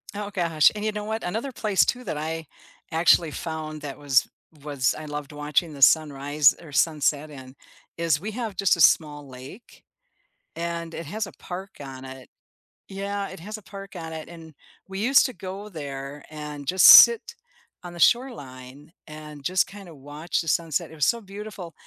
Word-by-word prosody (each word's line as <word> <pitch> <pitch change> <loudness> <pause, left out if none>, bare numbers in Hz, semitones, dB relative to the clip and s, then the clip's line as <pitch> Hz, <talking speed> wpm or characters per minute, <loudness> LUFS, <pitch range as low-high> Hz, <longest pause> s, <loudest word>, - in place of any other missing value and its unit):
Oh 205 0 -4
gosh, 170 -6 +3
and 210 - -5
you 215 - 0
know 210 0 -5
what, 220 +1 -4
another 225 +9 -3
place 210 -4 +2
too 250 - -2
that 155 - -4
I 160 +1 -4 0.5
actually 165 0 +4
found 155 -1 -6
that 145 -2 -7
was 140 -3 +2 0.4
was 140 -3 0
I 155 - -8
loved 145 -1 -6
watching 150 +2 -1
the 140 - -11
sunrise 145 0 +4
or 155 -4 -13
sunset 150 0 +1
in 130 -2 -12 0.4
is 165 -3 +1
we 210 +6 -5
have 220 -4 -5
just 195 -1 +3
a 170 - -2
small 150 -2 +3
lake, 130 - -13 0.7
and 170 -1 -4
it 165 - -6
has 210 +7 -3
a - - -11
park 190 +2 -8
on 135 -2 -9
it 130 0 -11 0.6
yeah, 200 +1 -4
it 190 - -10
has 210 +6 -7
a - - -19
park 195 +1 -11
on 165 -2 -7
it 160 -1 -7
and 165 -2 -12 0.4
we 190 0 -7
used 255 +6 +5
to 255 - -8
go 195 +1 -8
there, 140 -4 -7
and 150 -2 -8
just 185 +4 +4
sit 465 0 +9 0.5
on 175 -1 -8
the 175 - -10
shoreline, 145 - -1 0.2
and 150 -2 -11
just 185 +3 +2
kind 200 -1 -12
of 165 - -13
watch 145 +5 -4
the 165 - -9
sunset. 165 0 -1
It - - -11
was 150 -4 +1
so 235 +8 +1
beautiful, 200 -3 -9
165 Hz, 185 wpm, -25 LUFS, 145-195 Hz, 0.7 s, sit